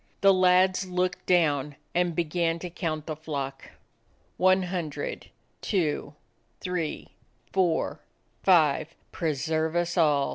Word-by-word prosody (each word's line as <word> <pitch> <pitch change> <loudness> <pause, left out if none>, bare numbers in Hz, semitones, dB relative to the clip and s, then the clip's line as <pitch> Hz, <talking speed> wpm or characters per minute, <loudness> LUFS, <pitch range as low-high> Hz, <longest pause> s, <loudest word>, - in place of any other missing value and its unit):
The 195 -1 +7
lads 185 +1 +4
looked 180 0 -1
down 150 -5 +2 0.2
and 175 -1 +1
began 170 0 0
to 175 +1 -7
count 155 -4 -3
the 155 - -4
flock. 145 -3 -5 0.7
"One 185 +1 +4
hundred, 180 - -4 0.3
two, 155 -6 -1 0.4
three, 180 -4 -3 0.4
four, 180 -4 +1 0.4
five. 160 -3 +3 0.2
Pre 160 -4 -1
serve 160 +3 -1
us 175 +1 0
all!" 145 -4 +3
170 Hz, 115 wpm, -27 LUFS, 155-180 Hz, 0.7 s, The